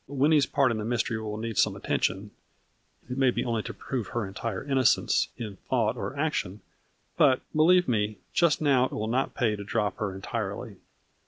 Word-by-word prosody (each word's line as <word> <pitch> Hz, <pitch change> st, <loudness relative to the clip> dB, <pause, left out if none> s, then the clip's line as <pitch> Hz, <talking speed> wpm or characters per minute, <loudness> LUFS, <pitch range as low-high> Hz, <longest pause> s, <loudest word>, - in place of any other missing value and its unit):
Winnie's 145 Hz, +2 st, +3 dB
part 135 Hz, -3 st, +2 dB
in 110 Hz, -, -2 dB
the -, -, -3 dB
mystery 115 Hz, 0 st, -1 dB
will 105 Hz, -1 st, -4 dB
need 115 Hz, -1 st, -3 dB
some -, -, +3 dB
attention, 95 Hz, +2 st, -1 dB, 0.8 s
it 125 Hz, +2 st, -4 dB
may 135 Hz, -1 st, +5 dB
be -, -, -1 dB
only 115 Hz, -2 st, 0 dB
to -, -, -6 dB
prove 125 Hz, -7 st, -4 dB
her 120 Hz, -3 st, -2 dB
entire 95 Hz, +1 st, -4 dB
innocence, 135 Hz, -4 st, +2 dB
in 105 Hz, -4 st, -6 dB
thought 115 Hz, -3 st, +1 dB
or 130 Hz, +3 st, -5 dB
action, 140 Hz, -, -2 dB, 0.6 s
but, 135 Hz, -4 st, +4 dB
believe 180 Hz, +4 st, +5 dB
me, 105 Hz, -3 st, 0 dB, 0.2 s
just 170 Hz, -3 st, +3 dB
now 135 Hz, -4 st, +4 dB
it -, -, -5 dB
will 105 Hz, -, -2 dB
not 130 Hz, +4 st, -1 dB
pay 115 Hz, -4 st, +1 dB
to 100 Hz, -, -7 dB
drop 105 Hz, 0 st, -1 dB
her 100 Hz, -3 st, -3 dB
entirely. 95 Hz, -, -5 dB
120 Hz, 185 wpm, -27 LUFS, 105-135 Hz, 0.8 s, may